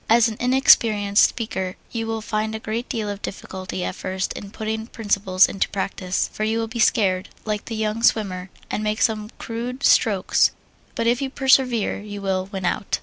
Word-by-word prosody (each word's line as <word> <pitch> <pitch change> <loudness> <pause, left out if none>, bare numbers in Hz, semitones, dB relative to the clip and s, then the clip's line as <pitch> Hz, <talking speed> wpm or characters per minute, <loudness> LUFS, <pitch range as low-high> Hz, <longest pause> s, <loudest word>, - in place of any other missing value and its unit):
As 230 +1 +6
an 220 - -4
inexperienced 225 -5 +5
speaker 190 -5 -4 0.2
you 225 -1 -3
will 225 0 -2
find 215 0 -2
a - - -4
great 225 +2 -4
deal 220 -3 -2
of 205 0 -5
difficulty 185 -1 -5
at - - -2
first 190 0 -3
in 200 - -8
putting 220 +1 -4
principles 200 -5 +2
into 195 - -1
practise, 190 -2 -2
for 215 - -3
you 220 +1 +1
will 230 - 0
be 235 +1 -6
scared, 190 -5 +2 0.2
like 210 -1 -2
the 230 - -5
young 215 +1 -1
swimmer, 190 -5 +1 0.2
and 210 - -2
make 215 +1 -1
some 215 -1 +1
crude 245 +4 -5
strokes, 200 -6 +4 0.4
but 230 - -1
if 240 +2 +2
you 270 - -1
persevere 260 -6 +2
you 205 0 -7
will 190 -1 -1
"win 195 -2 -5
out." 185 - 0
215 Hz, 190 wpm, -23 LUFS, 195-230 Hz, 0.4 s, As